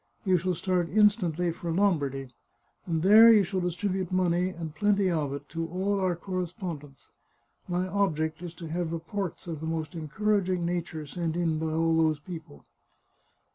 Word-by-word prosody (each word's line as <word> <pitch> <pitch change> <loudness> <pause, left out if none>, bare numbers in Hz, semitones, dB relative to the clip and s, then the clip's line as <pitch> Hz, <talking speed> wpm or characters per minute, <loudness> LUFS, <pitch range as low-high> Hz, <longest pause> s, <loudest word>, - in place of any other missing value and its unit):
" - - -38
You 185 -2 +4
shall 180 +1 -1
start 180 0 0
instantly 180 -5 +3
for 170 +1 -5
Lombardy, 145 -8 0 0.6
and 165 -2 -1
there 220 +4 +9
you 215 -3 +6
shall 190 +1 -2
distribute 185 +1 -2
money, 180 0 +2
and 165 -4 -7
plenty 200 0 +2
of 150 -4 -1
it, 140 +1 -6
to 165 +1 -3
all 195 +4 -1
our 185 -2 +1
correspondents. 175 -5 -6 0.6
My 180 +1 -1
object 160 -5 0
is 175 -1 -7
to 165 -1 -8
have 170 0 -2
reports 170 +2 -4
of 165 -3 -5
the 160 - -5
most 160 -1 -3
encouraging 185 +2 0
na 175 0 0
ture 160 -2 -7
sent 165 +2 -3
in 165 -3 0
by 160 - -2
all 165 +1 +2
those 160 -1 +3
people." 160 -1 -10
175 Hz, 175 wpm, -28 LUFS, 160-185 Hz, 0.6 s, there